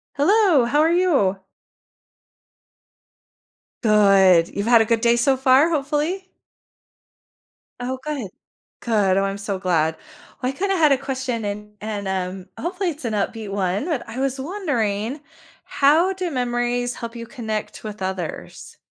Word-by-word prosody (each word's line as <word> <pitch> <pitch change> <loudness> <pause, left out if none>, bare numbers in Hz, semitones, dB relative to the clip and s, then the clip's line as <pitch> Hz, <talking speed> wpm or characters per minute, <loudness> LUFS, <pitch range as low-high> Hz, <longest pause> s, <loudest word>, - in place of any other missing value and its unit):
Hello, 340 - +4
how 285 +5 +1
are 320 +1 +3
you? 280 - +2 2.4
Good. 195 -5 +5
You've 200 +2 -2
had 235 -1 +6
a - - +2
good 225 0 +1
day 235 0 +4
so 250 +3 +2
far, 265 +4 +4
hopefully? 305 +5 -1 1.5
Oh, 255 +1 -4
good. 285 -9 -4 0.5
Good. 205 -5 +2
Oh, 195 - +2
I'm 195 0 -2
so 200 -1 -4
glad. 165 -4 +1 0.5
Well, 255 0 0
I, - - -14
kinda, 390 +4 0
had 310 -5 +4
a 275 - +4
question 260 -4 -3
and 210 +1 -6
and, 210 -2 -4
um, 185 -1 -3
hopefully 360 +2 -2
it's 300 -4 -7
an 225 - -2
upbeat 210 +1 -2
one, 195 +3 -1
but 310 -8 -3
I 230 +3 -6
was 270 0 -1
wondering 265 - -2 0.4
how 320 +7 +3
do 370 -2 -4
memories 245 -1 -1
help 235 -1 -7
you 230 0 -6
connect 220 -4 -5
with 215 -1 -7
others? 185 -3 -6
240 Hz, 145 wpm, -22 LUFS, 205-290 Hz, 2.4 s, had